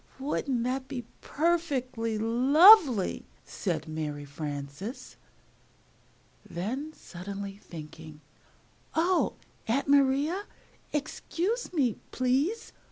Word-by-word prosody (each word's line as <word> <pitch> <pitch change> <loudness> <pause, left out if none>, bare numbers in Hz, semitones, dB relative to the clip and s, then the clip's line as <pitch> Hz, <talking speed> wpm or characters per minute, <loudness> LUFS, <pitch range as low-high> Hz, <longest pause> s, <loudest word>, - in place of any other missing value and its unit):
] - - -28
"Wouldn't 265 -3 -1
that 260 +1 -2
be 260 -3 -5 0.2
perfectly 270 -9 -1
lovely!" 265 - +6 0.2
said 165 -5 -3
Mary 150 -2 -4
Frances. 145 - -6 1.3
Then, 255 - -4
suddenly 195 - -7
thinking, 155 -4 -11 0.8
"Oh, 345 +3 +2 0.3
Aunt 255 +6 0
Maria, 285 +7 +3 0.5
excuse 345 - -2
me, 270 - +1
please! 270 - 0
255 Hz, 85 wpm, -29 LUFS, 185-295 Hz, 1.3 s, lovely